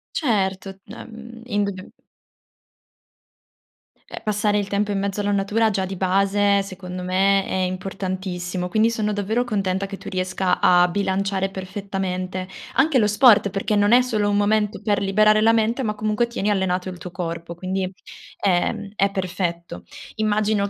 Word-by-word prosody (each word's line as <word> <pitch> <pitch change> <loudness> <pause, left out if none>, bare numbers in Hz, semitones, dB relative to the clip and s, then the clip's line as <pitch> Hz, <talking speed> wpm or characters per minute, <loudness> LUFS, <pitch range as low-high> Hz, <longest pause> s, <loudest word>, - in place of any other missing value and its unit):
Certo. 195 - 0
D 210 - -11
ehm, 230 0 -11
indubbiam 200 -5 -2 2.2
Eh, - - -8
passare 210 -1 0
il 200 -1 -2
tempo 205 +1 0
in 200 - -1
mezzo 200 +1 -2
alla 205 0 0
natura, 205 +3 +1
già 195 -2 -1
di 190 0 -5
base, 200 +2 +2
secondo 185 -1 -7
me, 195 +2 +2
è - - -5
importantissimo. 185 -1 -3
Quindi 220 +3 +3
sono 215 -2 -1
davvero 210 +4 0
contenta 195 -5 -1
che 195 0 -7
tu - - -12
riesca 185 0 -1
a 180 0 +5
bilanciare 195 +1 -1
perfettamente. 190 -1 -4 0.3
Anche 275 0 +3
lo 210 - +3
sport, 210 -1 +5
perché 195 +2 -1
non 205 +1 +3
è 245 +1 +7
solo 215 -5 0
un 205 - +1
momento 210 0 +1
per 210 -2 +1
liberare 215 +2 +4
la 225 +1 +5
mente, 230 +3 +1
ma 210 -3 -1
comunque 215 +2 0
tieni 235 -3 -2
allenato 190 -2 0
il 185 -1 -6
tuo 180 - -8
corpo, 170 -1 -5
quindi, 185 +1 -3 0.5
ehm, 200 +2 0
è 200 -1 +2
perfetto. 175 - -4 0.3
Immagino 215 -1 +1
200 Hz, 155 wpm, -22 LUFS, 185-210 Hz, 2.2 s, è